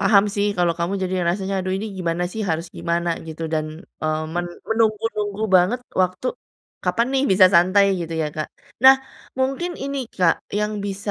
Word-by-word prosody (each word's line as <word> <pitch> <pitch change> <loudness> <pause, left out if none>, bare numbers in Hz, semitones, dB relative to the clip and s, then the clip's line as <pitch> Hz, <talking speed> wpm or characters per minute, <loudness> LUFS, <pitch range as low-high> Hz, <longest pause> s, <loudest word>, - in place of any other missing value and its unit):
paham 200 0 +5
sih 205 0 +1
kalau 175 -1 +2
kamu 170 +2 -1
jadi 185 0 -1
rasanya, 190 +2 -1
aduh 185 0 -2
ini 205 +3 -4
gimana 175 0 -1
sih, 220 - -4
harus 165 +1 -1
gimana 170 +1 -1 0.2
gitu 160 0 -7
dan, 155 -1 0 0.4
eee, 155 0 0
men 175 0 -1 0.2
menunggu-nunggu 215 -2 0
banget 200 +8 +2 0.2
waktu 185 +6 -2 0.6
kapan 235 +1 +1
nih 270 - +2
bisa 185 0 +7
santai 185 +4 +5 0.2
gitu 165 -1 -5
ya, - - 0
Kak? 155 - -3 0.4
Nah, 265 0 +10 0.4
mungkin 270 +7 0
ini, 275 0 -3 0.2
Kak, 180 -3 +4 0.2
yang 210 0 0
bisa 200 +1 -4
190 Hz, 175 wpm, -22 LUFS, 170-215 Hz, 0.6 s, Nah